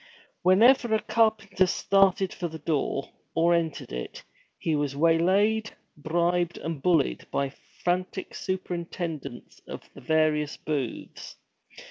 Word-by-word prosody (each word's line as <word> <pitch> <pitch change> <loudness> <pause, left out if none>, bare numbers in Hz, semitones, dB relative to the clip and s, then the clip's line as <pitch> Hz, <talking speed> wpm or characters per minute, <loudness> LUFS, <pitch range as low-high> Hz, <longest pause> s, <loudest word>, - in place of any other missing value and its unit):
Whenever 225 +5 +5
a - - +2
carpenter 215 -5 +2
started 195 0 +2
for 175 - -3
the 160 -1 -8
door, 150 -3 -1 0.3
or 170 +1 +4
entered 165 -3 -1
it, - - -6 0.3
he 160 - -1
was 145 -2 -1
waylaid, 190 +8 +2 0.2
bribed, 175 +3 0
and 160 -4 -5
bullied 165 -4 +1
by 140 0 -1
the - - -20 0.3
frantic 185 +2 -1
superintendents 170 -7 -5
of - - -7
the - - -12
various 155 -2 +1
booths. 140 -6 -5
170 Hz, 120 wpm, -27 LUFS, 155-190 Hz, 0.3 s, Whenever